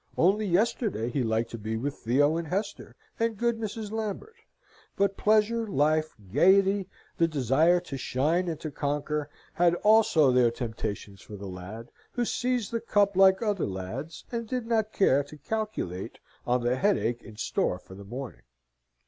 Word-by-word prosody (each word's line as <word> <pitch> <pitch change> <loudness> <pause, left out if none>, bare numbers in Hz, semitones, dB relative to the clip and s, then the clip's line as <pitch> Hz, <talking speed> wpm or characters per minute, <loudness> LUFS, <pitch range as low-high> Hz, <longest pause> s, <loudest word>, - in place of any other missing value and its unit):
Only 200 +5 +3
yesterday, 185 - 0
he 135 - 0
liked 115 0 0
to 115 - -6
be 110 +1 -3
with 140 +5 -2
Theo 145 +5 +2
and 165 -1 -3
Hester, 200 +5 -4 0.2
and 230 -1 0
good 235 +1 0
Mrs. 215 -1 -5
Lambert; 220 - -4 0.6
but 195 0 +1
pleasure, 220 +2 +2
life, 155 -3 +1 0.2
gaiety, 195 +5 +4 0.3
the 165 - +4
desire 155 +4 +3
to 150 -6 -6
shine 155 +8 0
and 160 -3 -3
to 155 - -5
conquer, 145 +1 -2 0.2
had 175 0 +3
also 210 -10 +5
their 125 -1 +4
temptations 110 -4 -5
for 105 - -10
the 100 0 -8
lad, 95 +5 -8 0.2
who 245 -1 0
seized 245 -3 -1
the 230 -1 -2
cup 205 -3 +2
like 190 +2 +5
other 205 - 0
lads, 100 - -6
and 230 -1 -3
did 250 0 -3
not 220 -2 0
care 145 -10 +3
to 150 +2 -13
calculate 210 - -4 0.3
on 125 0 +1
the 120 +2 +1
headache 125 - +1
in 110 -2 -13
store 90 - 0
for 95 - -15
the 100 +1 -10
morning. 125 +5 -7
160 Hz, 165 wpm, -28 LUFS, -, 0.6 s, also